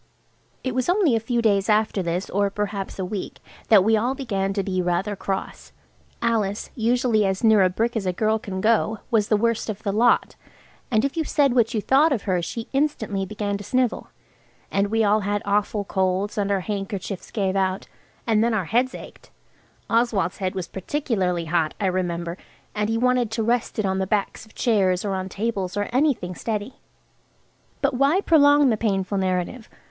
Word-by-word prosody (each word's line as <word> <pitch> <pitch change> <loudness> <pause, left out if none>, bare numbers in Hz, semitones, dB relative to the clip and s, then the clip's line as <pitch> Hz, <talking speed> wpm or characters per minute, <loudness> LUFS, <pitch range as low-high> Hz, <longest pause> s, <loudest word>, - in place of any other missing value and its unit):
It 260 - -2
was 255 +3 -1
only 355 - +3
a - - +2
few 235 +1 -1
days 200 -2 +2
after 215 -2 +2
this, 175 +2 -2
or 200 +1 +1
perhaps 200 -1 -4
a 190 - -2
week, 195 +1 -5 0.3
that 210 -4 +6
we 220 +2 +3
all 240 +5 0
began 195 -8 -2
to 195 -1 -1
be 185 -1 -1
rather 180 +4 -1
cross. 195 0 -5 0.5
Alice, 215 -3 0
usually 235 -1 +2
as 190 +1 -1
near 220 -2 +6
a 185 - +4
brick 230 +6 -1
as 205 -4 -2
a - - +2
girl 215 +4 0
can 190 -3 -5
go, 220 0 +2
was 215 -3 +2
the 215 - +3
worst 230 +1 0
of 210 -1 -5
the 200 - -1
lot, 235 +3 +3 0.5
and 220 +1 +2
if 275 - -2
you 325 - 0
said 285 -4 +2
what 235 -1 +2
you 215 - 0
thought 285 +8 +4
of 240 -7 -1
her 185 -3 0
she 225 +7 -5
instantly 220 -9 -1
began 205 -1 -3
to - - -7
snivel. 250 +3 0 0.6
And 200 +1 +1
we 225 +2 +1
all 210 +1 +3
had 205 0 -2
awful 205 +1 0
colds, 190 +1 -1
and 205 -2 -1
our 195 -1 +1
handkerchiefs 195 -1 -5
gave 195 -3 -1
out, 190 0 -1 0.4
and 220 -2 +3
then 235 -1 +1
our 195 -5 -1
heads 245 +7 +1
ached. - - -12 0.6
Oswald's 225 -6 +1
head 185 -1 -2
was 185 -2 -3
particularly 190 - -2
hot, 165 -1 0
I 205 - -1
remember, 175 -2 -2 0.4
and 210 0 -1
he 225 - 0
wanted 250 -1 +2
to 225 +1 -2
rest 235 +1 0
it 215 - 0
on 190 0 0
the 190 - -1
backs 210 +2 -2
of 220 - -22
chairs 195 -5 +1
or 200 - -1
on 190 0 -3
tables–or 205 -2 -2
anything 255 -10 +1
steady. 215 +5 -4 1.1
But 280 0 +2
why 275 +8 +3
prolong 290 -5 +5
the 220 - +1
painful 195 -2 -1
narrative? 185 +5 -2
210 Hz, 195 wpm, -23 LUFS, 190-230 Hz, 1.1 s, that